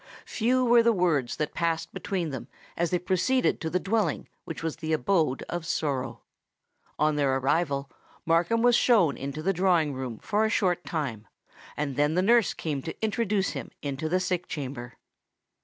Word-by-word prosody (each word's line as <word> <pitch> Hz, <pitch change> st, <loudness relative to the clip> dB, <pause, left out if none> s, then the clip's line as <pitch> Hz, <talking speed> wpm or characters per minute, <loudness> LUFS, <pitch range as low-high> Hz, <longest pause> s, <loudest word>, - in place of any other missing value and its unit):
Few 250 Hz, +3 st, +1 dB
were 240 Hz, 0 st, +6 dB
the 230 Hz, 0 st, +4 dB
words 155 Hz, -, +1 dB
that 150 Hz, -, -3 dB
passed 165 Hz, -1 st, -1 dB
between 180 Hz, -6 st, -3 dB
them 130 Hz, -2 st, -6 dB, 0.3 s
as 170 Hz, 0 st, 0 dB
they 180 Hz, -, +1 dB
proceeded 190 Hz, +9 st, +1 dB
to 160 Hz, -, -2 dB
the 180 Hz, -, 0 dB
dwelling 215 Hz, +3 st, 0 dB, 0.2 s
which 165 Hz, -, -6 dB
was 160 Hz, -2 st, -2 dB
the 160 Hz, 0 st, -2 dB
abode 155 Hz, -5 st, +1 dB
of 175 Hz, -1 st, -4 dB
sorrow. 140 Hz, -5 st, -2 dB, 0.7 s
On 150 Hz, 0 st, +2 dB
their 135 Hz, -2 st, +2 dB
arrival 140 Hz, 0 st, 0 dB, 0.4 s
Markham 175 Hz, +8 st, +2 dB
was 245 Hz, -1 st, +5 dB
shown 200 Hz, -, +4 dB
into 140 Hz, +3 st, -5 dB
the 195 Hz, +3 st, +2 dB
drawing 175 Hz, -5 st, +2 dB
room 130 Hz, -4 st, -5 dB
for 215 Hz, -, 0 dB
a 220 Hz, -, +2 dB
short 180 Hz, -5 st, +1 dB
time; 125 Hz, -10 st, -3 dB, 0.5 s
and 145 Hz, -3 st, -2 dB
then 150 Hz, +2 st, +2 dB
the 180 Hz, -, +2 dB
nurse 230 Hz, +1 st, +4 dB
came 150 Hz, -4 st, -3 dB
to 160 Hz, -, -7 dB
introduce 210 Hz, -2 st, 0 dB
him -, -, -6 dB
into 145 Hz, +2 st, -3 dB
the 185 Hz, +3 st, +2 dB
sick 180 Hz, -1 st, -2 dB
chamber. 130 Hz, -5 st, -6 dB
165 Hz, 175 wpm, -27 LUFS, 145-195 Hz, 0.7 s, were